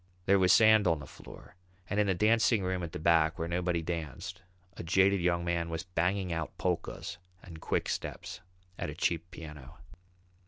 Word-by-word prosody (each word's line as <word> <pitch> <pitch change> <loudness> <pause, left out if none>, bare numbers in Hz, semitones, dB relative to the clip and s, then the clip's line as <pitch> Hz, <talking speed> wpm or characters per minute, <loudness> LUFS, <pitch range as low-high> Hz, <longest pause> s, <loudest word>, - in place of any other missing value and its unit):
There 100 0 +4
was 90 -1 +4
sand 110 -1 +6
on 85 -2 +3
the 75 - -9
floor, - - -13 0.3
and 105 - -1
in 105 - +3
the 95 - +2
dancing 110 +1 +3
room 90 0 -1
at 85 -2 -5
the - - -5
back, 80 +1 +3
where 85 -1 -3
nobody 85 -1 -1
danced, 85 +3 -5 0.3
a - - -7
jaded 95 +3 +3
young 85 -1 +1
man 85 -1 -1
was 80 +1 -3
banging 90 +1 -1
out 80 -1 -4
polkas 90 -2 -3 0.2
and 80 -3 -11
quick - - -1
steps - - -5 0.4
at - - -3
a - - -7
cheap 85 +1 -1
piano. 75 -5 -10
90 Hz, 185 wpm, -30 LUFS, 85-95 Hz, 0.4 s, sand